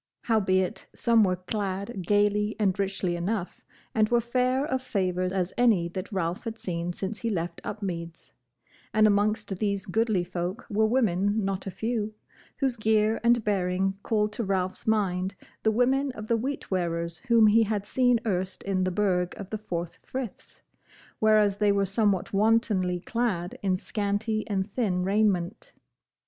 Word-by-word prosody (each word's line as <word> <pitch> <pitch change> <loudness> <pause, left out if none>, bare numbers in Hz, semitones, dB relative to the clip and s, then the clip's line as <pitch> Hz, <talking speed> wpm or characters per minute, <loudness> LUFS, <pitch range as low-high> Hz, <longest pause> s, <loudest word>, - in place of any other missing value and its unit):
Howbeit 190 -5 +1
some 230 -2 +4
were 185 -2 +2
clad 195 +1 -4
gaily 210 +1 +2
and 195 -3 +1
richly 190 -2 -1
enough, 185 +2 -3 0.3
and 215 -1 +3
were 240 - +4
fair 255 +3 +1
of 260 -3 -1
favour 185 -6 -1
as 185 -1 -1
any 210 -9 +4
that 185 +4 -6
Ralph 180 -2 -2
had 225 0 -4
seen 175 -3 -3
since 195 +4 -5
he 230 - -2
left 170 -4 -3
Upmeads: 170 -5 -5 0.6
and 215 0 +6
amongst 210 -1 +1
these 200 -2 -1
goodly 215 -1 +1
folk 180 +5 -4
were 220 +1 +3
women 210 -3 +1
not 195 0 -2
a - - -1
few, 215 +2 -2 0.4
whose 265 -4 0
gear 220 0 +2
and 235 -1 +4
bearing 195 -1 0
called 210 -1 0
to 230 - -3
Ralph's 190 -1 -2
mind 195 -3 +1 0.3
the 220 - +3
women 260 +4 +2
of 215 - -7
the 230 - +2
Wheatwearers 175 -10 -2
whom 230 -2 +6
he 215 +2 +6
had 210 -2 0
seen 245 +1 +3
erst 190 -3 -2
in 190 -1 0
the 185 - +1
Burg 180 -2 0
of 200 -2 -8
the 215 - -3
Four 175 -5 -3 0.2
Friths, 255 -5 -7 0.6
whereas 215 -2 +4
they 205 -1 +3
were 200 0 +2
somewhat 200 -1 0
wantonly 200 -4 +2
clad 200 -6 -1
in 190 -2 +1
scanty 210 +2 -2
and 195 0 -2
thin 190 -7 0
raiment. 195 -1 0
205 Hz, 160 wpm, -27 LUFS, 185-220 Hz, 0.6 s, and